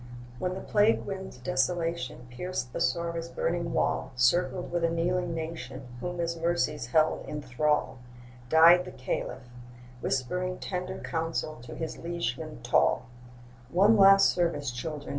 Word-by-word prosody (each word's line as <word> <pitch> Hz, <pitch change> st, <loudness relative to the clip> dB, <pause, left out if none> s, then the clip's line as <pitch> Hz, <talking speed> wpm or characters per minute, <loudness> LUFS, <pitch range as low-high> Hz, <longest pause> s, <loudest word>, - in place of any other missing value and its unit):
When 180 Hz, 0 st, -2 dB
the -, -, -5 dB
plague 210 Hz, +2 st, +2 dB
wind's 190 Hz, -7 st, -6 dB
desolation 135 Hz, 0 st, -1 dB
Pierced 125 Hz, -2 st, -4 dB
Bassora's 170 Hz, +5 st, -1 dB
burning 170 Hz, 0 st, -1 dB
wall, -, -, 0 dB
Circled 175 Hz, +9 st, +2 dB
with 175 Hz, -1 st, -1 dB
a 165 Hz, -, +3 dB
kneeling 170 Hz, +1 st, 0 dB
nation 150 Hz, -5 st, -6 dB
Whom 175 Hz, +7 st, -4 dB
his 170 Hz, -1 st, -1 dB
mercies 165 Hz, -5 st, -1 dB
held 155 Hz, +5 st, +2 dB
in 150 Hz, -, -4 dB
thrall, 135 Hz, +1 st, 0 dB, 0.5 s
Died 165 Hz, +4 st, +7 dB
the 185 Hz, -, -8 dB
Caliph, 130 Hz, 0 st, -4 dB, 0.5 s
whispering 180 Hz, +8 st, -1 dB
tender 185 Hz, 0 st, -4 dB
Counsel 160 Hz, -2 st, -3 dB
to 120 Hz, 0 st, -9 dB
his 160 Hz, -1 st, -5 dB
liegemen 165 Hz, -, -4 dB
tall: -, -, +2 dB, 0.6 s
'One 200 Hz, +9 st, +5 dB
last 195 Hz, -1 st, +7 dB
service, 160 Hz, -6 st, 0 dB
children! 145 Hz, +4 st, -6 dB
165 Hz, 135 wpm, -28 LUFS, 135-180 Hz, 0.6 s, Died